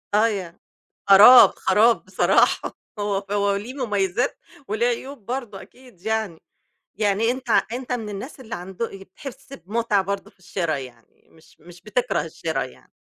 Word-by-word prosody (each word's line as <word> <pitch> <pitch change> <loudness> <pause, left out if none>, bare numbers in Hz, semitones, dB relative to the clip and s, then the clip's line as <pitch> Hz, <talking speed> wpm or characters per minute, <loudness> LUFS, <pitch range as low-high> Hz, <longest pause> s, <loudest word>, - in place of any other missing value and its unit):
أيوه، 205 -6 0 0.5
خراب، 215 +6 +10
خراب 230 +2 +3
بصراحة، - - +2 0.2
هو 200 -1 -2
هو 200 -1 +1
ليه 215 +6 -6
مميزات 215 -2 -1 0.3
وليه 220 +3 0
عيوب 245 -1 -4
برضه 240 -5 -5
أكيد 250 -8 -18
يعني، 220 -4 -2 0.6
يعني 210 +2 +1
أنت 255 0 -5 0.2
أنت 250 +1 -4
من 230 -4 -3
الناس 210 +8 -8
اللي 235 -3 -7
عندو 185 +6 -5
بتحس 265 +8 -11
بمتعة 220 -3 -1
برضه 200 +1 -4
في - - -36
الشرا، 180 -3 -2
يعني 125 -4 -12
مش 160 0 -22
مش 175 +2 -15
بتكره 225 +5 -1
الشرا - - -3
يعني. - - -15
210 Hz, 145 wpm, -23 LUFS, 195-240 Hz, 0.6 s, خراب